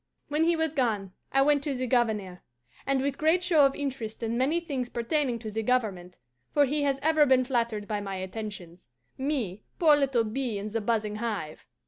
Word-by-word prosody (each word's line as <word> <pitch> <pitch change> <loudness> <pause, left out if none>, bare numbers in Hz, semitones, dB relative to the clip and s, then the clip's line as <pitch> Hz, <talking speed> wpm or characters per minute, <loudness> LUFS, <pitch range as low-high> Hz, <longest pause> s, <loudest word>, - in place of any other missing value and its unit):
When 300 +2 +2
he 340 0 +3
was 320 -1 0
gone 220 -9 -1 0.2
I 270 0 +4
went 290 0 +3
to 285 -3 -2
the 255 0 -2
Governor, 220 -7 0 0.5
and, 270 -1 +2
with 275 -1 -2
great 320 +4 +3
show 320 -6 +5
of 270 - -5
interest 255 -6 -4
in 225 +1 -1
many 275 +7 +2
things 275 -7 -4
pertaining 245 +1 0
to 220 -2 -7
the 225 +1 -2
government 210 -7 -1 0.4
(for 290 -1 +6
he 290 +2 -1
has 280 -1 +1
ever 310 -1 +4
been 260 -1 +5
flattered 235 -5 -1
by 210 -2 -2
my 195 -1 -4
attentions 185 - -7 0.3
me, 260 -9 -2 0.2
poor 310 -3 +6
little 270 -5 +2
bee 230 0 -2
in 205 +2 -4
the 225 +1 -2
buzzing 215 -1 -1
hive!) 210 -9 -4
245 Hz, 195 wpm, -28 LUFS, 215-285 Hz, 0.5 s, for